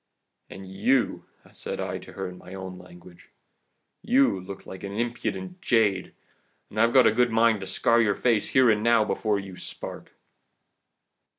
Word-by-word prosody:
"'And 95 0 -10
you,' 110 +7 0 0.3
said - - -6
I - - -3
to - - -13
her 95 -1 -4
in 90 0 -10
my 95 - -11
own 95 -1 -8
language, 90 -1 -16 0.7
'you 255 - +3
look 95 +1 -9
like 95 - -10
an 100 - -5
impudent 125 - -4
jade 105 - +1 0.6
and 110 - 0
I've 115 +3 +3
a 130 -4 +7
good 120 +2 +2
mind 115 -2 +3
to 95 - -6
scar 115 +5 +2
your 105 -3 +2
face 115 -4 +1
here 130 -1 +4
and 105 -1 +1
now, 115 -1 +4
before 105 -1 0
your 95 -2 -8
spark. - - -7
105 Hz, 165 wpm, -26 LUFS, 95-120 Hz, 0.7 s, a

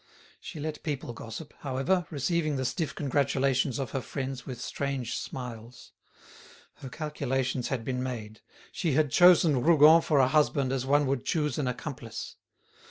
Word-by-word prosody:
She 160 - -9
let 155 +1 -4
people 140 -5 -4
gossip, 115 +7 -8
however, 145 +6 0
receiving 155 +1 -1
the 130 -1 -2
stiff 135 +5 -2
congratulations 135 -2 +1
of 135 -3 -4
her 135 - -2
friends 130 -2 -5
with 125 -3 -6
strange 135 -2 -3
smiles. 120 -2 -7 0.9
Her 135 - -9
calculations 135 -4 -2
had 125 -5 -3
been 125 -1 -2
made; 110 -4 -6 0.3
she 165 -6 -1
had 150 -1 +2
chosen 170 -6 +6
Rougon 160 +2 +7
for 155 -2 +1
a 130 -2 +5
husband 140 -2 +2
as 130 -1 -2
one 145 +1 +3
would 135 -2 -1
choose 150 -4 -1
an 140 - -1
accomplice. 125 -2 -6
135 Hz, 155 wpm, -28 LUFS, 125-150 Hz, 0.9 s, Rougon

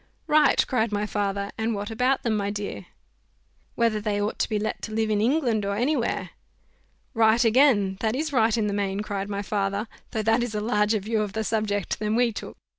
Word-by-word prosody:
"Right," 300 -2 +4
cried 230 -3 0
my 205 0 -1
father; 200 -1 -2
"and 220 0 0
what 205 +2 -4
about 250 +4 +1
them, 230 -2 +1
my 200 -1 -1
dear?" 205 0 -5 0.9
"Whether 230 -2 +1
they 205 -1 -1
ought 205 +1 -2
to - - 0
be 215 - 0
let 210 +1 -3
to 220 - -6
live 220 0 0
in 210 -1 +1
England, 240 -3 +1
or 200 0 -1
any 255 +8 +1
where." 235 -4 -2 0.8
"Right 225 +1 +4
again, 220 -6 +4
that 220 +2 0
is 305 +2 -2
right 225 -3 +3
in 220 - +1
the 205 - -1
main," 200 0 -1
cried 200 -2 -4
my 200 0 -3
father; 200 +1 -1 0.2
"though 220 -2 -2
that 225 +2 +3
is 240 -3 -3
a - - 0
larger 210 0 +1
view 215 +2 -1
of 205 -2 -3
the 220 - -1
subject 215 -3 -1
than 215 +1 0
we 240 0 +3
took." - - -8
215 Hz, 215 wpm, -25 LUFS, 205-230 Hz, 0.9 s, Right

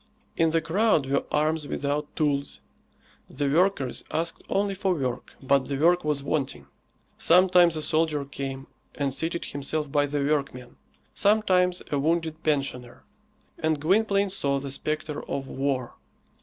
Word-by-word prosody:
In 165 0 +3
the 165 +1 +1
crowd 170 -1 +2
were 140 +1 0
arms 155 0 +1
without 145 +1 -3
tools; 140 -2 0 0.7
the 145 - -2
workers 155 -3 +1
asked 165 +1 -2
only 200 0 +1
for 190 -1 0
work, 130 -4 -4
but 135 0 +3
the 140 0 -3
work 175 +4 +3
was 150 -2 -1
wanting. 140 -1 -2 0.5
Sometimes 180 -1 +5
a 155 - -3
soldier 155 -2 0
came 135 -1 -6 0.3
and 140 -2 -1
seated 165 +4 -2
himself 145 +1 -3
by 145 0 +2
the 145 0 -2
workmen, 140 -4 -2 0.4
sometimes 185 -4 +2
a 145 - +1
wounded 160 +1 0
pensioner; 135 -6 -2 0.6
and 155 -1 0
Gwynplaine 200 +4 +2
saw 140 -7 0
the 135 0 -5
spectre 150 +1 -3
of 135 -1 -3
war. 135 -2 -2
150 Hz, 140 wpm, -26 LUFS, 140-170 Hz, 0.7 s, Sometimes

